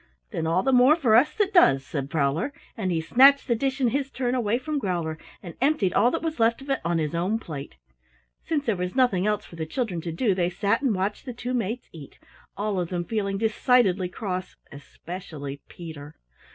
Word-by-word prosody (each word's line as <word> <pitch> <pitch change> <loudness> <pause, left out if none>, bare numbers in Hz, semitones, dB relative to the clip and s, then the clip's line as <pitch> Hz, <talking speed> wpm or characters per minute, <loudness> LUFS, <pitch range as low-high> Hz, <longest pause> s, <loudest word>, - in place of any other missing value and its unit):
"Then 160 - -2
all 170 +3 +2
the 270 - +2
more 255 +4 +6
for 265 -10 +2
us 255 +6 +5
that 415 -1 0
does," 135 - +5
said 140 -3 -4
Prowler, 155 - 0 0.2
and 190 -5 -2
he 165 -2 0
snatched 270 +11 +5
the 240 - +3
dish 270 +4 -1
in 250 -3 +3
his 275 +2 -1
turn 250 -2 -2
away 235 -3 +1
from 295 +3 -3
Growler 170 - -2 0.2
and 175 -3 -8
emptied 270 - +2
all 240 - +4
that 330 - -3
was 320 -5 -3
left 230 0 +3
of 275 +1 -6
it 270 - +1
on 170 0 0
his 155 -1 -1
own 180 +6 0
plate. 145 - -8 0.7
Since 295 -3 -1
there 225 -5 +1
was 180 +2 -4
nothing 210 -8 +2
else 210 -1 0
for 170 - -13
the 160 -1 -4
children 205 - -2
to 165 - -4
do, 200 +5 +1
they 180 -1 0
sat 200 +5 0
and 255 -7 +1
watched 195 +6 -2
the 250 - -5
two 245 +1 -4
mates 235 0 -2
eat, 150 -4 -12 0.4
all 205 -2 -1
of 175 -2 -2
them 175 -1 -3
feeling 200 -2 -2
decidedly 215 -4 +2
cross, 185 -1 -5 0.2
especially 145 -1 -8
Peter. 155 -4 -10
205 Hz, 215 wpm, -25 LUFS, 170-250 Hz, 0.7 s, more